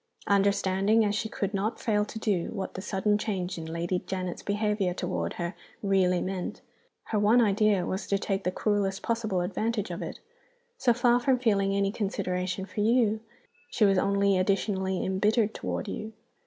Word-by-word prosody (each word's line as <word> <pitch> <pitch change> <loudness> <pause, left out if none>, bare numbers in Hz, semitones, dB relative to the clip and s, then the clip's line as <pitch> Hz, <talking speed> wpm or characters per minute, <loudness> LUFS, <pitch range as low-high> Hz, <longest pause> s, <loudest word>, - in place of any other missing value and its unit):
Understanding, 200 +2 +3
as 205 - +1
she 220 +1 -2
could 200 -1 -3
not 205 +4 -1
fail 210 -3 +1
to 215 - -8
do, 200 -6 0
what 195 -3 -4
the 185 - -5
sudden 205 +1 +1
change 185 -4 -3
in 160 - -6
Lady 170 +3 -2
Janet's 185 -2 -3
behavior 205 -3 0
toward 85 - -2
her 175 +1 -3 0.3
really 185 -3 +3
meant, 185 -1 -4 0.5
her 215 - +1
one 215 +4 +5
idea 210 -4 +3
was 190 +3 -3
to 200 - +2
take 195 0 -2
the 180 - 0
cruelest 195 -1 0
possible 220 -5 0
advantage 210 +4 -2
of - - -5
it. - - -6 0.6
So 245 - +4
far 240 +1 +3
from 255 +1 +2
feeling 200 -5 +2
any 200 0 +1
consideration 190 -3 -2
for 195 - -7
you, 220 0 +3 0.5
she 215 - +3
was 195 -2 +4
only 200 -1 +2
additionally 190 0 0
imbittered 210 +3 +2
toward 90 -1 -4
you. 220 +1 -5
200 Hz, 170 wpm, -28 LUFS, 190-215 Hz, 0.6 s, one